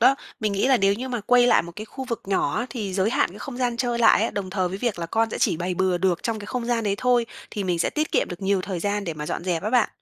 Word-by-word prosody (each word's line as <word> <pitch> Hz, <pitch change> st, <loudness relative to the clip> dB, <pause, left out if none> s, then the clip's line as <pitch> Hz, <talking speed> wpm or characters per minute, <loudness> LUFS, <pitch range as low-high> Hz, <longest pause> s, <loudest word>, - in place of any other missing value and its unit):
đó. 260 Hz, +4 st, +6 dB, 0.3 s
Mình 215 Hz, -2 st, 0 dB
nghĩ 200 Hz, +7 st, +1 dB
là 265 Hz, -, +6 dB
nếu 195 Hz, -2 st, +3 dB
như 255 Hz, +5 st, -5 dB
mà 245 Hz, -3 st, -2 dB
quây 245 Hz, +3 st, +4 dB
lại 245 Hz, -, +5 dB
một 170 Hz, -, -9 dB
cái 215 Hz, -, -5 dB
khu 265 Hz, +4 st, -7 dB
vực 235 Hz, -3 st, -4 dB
nhỏ 195 Hz, +2 st, 0 dB
á, 240 Hz, -, -1 dB
thì 205 Hz, -7 st, -4 dB
giới 195 Hz, +3 st, +2 dB
hạn 205 Hz, -, +2 dB
cái 200 Hz, -, -11 dB
không 260 Hz, +1 st, -7 dB
gian 245 Hz, -2 st, 0 dB
chơi 240 Hz, -1 st, -1 dB
lại 225 Hz, -2 st, +5 dB
ấy, 225 Hz, -, 0 dB
đồng 195 Hz, -2 st, -4 dB
thời 185 Hz, -2 st, 0 dB
với 190 Hz, -, -5 dB
việc 225 Hz, -4 st, -1 dB
là 170 Hz, -, -3 dB
con 225 Hz, +5 st, +1 dB
sẽ -, -, -4 dB
chỉ 180 Hz, -7 st, +2 dB
bày 180 Hz, +2 st, -2 dB
bừa 185 Hz, -1 st, +1 dB
được 180 Hz, -2 st, +1 dB
trong 225 Hz, -2 st, -1 dB
cái 205 Hz, -, -8 dB
không 250 Hz, +1 st, -3 dB
gian 235 Hz, -1 st, 0 dB
đấy 200 Hz, -1 st, +1 dB
thôi, 245 Hz, -2 st, +2 dB, 0.2 s
thì 205 Hz, -, -3 dB
mình 180 Hz, -2 st, 0 dB
sẽ 165 Hz, -, +1 dB
tiết 305 Hz, 0 st, -2 dB
kiệm -, -, +2 dB
được 175 Hz, +2 st, -7 dB
nhiều 195 Hz, 0 st, +2 dB
thời 185 Hz, -3 st, -4 dB
gian 205 Hz, +1 st, -1 dB
để 165 Hz, -4 st, -3 dB
mà 150 Hz, -1 st, -6 dB
dọn 170 Hz, -, -3 dB
dẹp 175 Hz, -2 st, -1 dB
á 215 Hz, -, -2 dB
bạn. 245 Hz, -2 st, +3 dB
205 Hz, 335 wpm, -24 LUFS, 185-240 Hz, 0.3 s, đó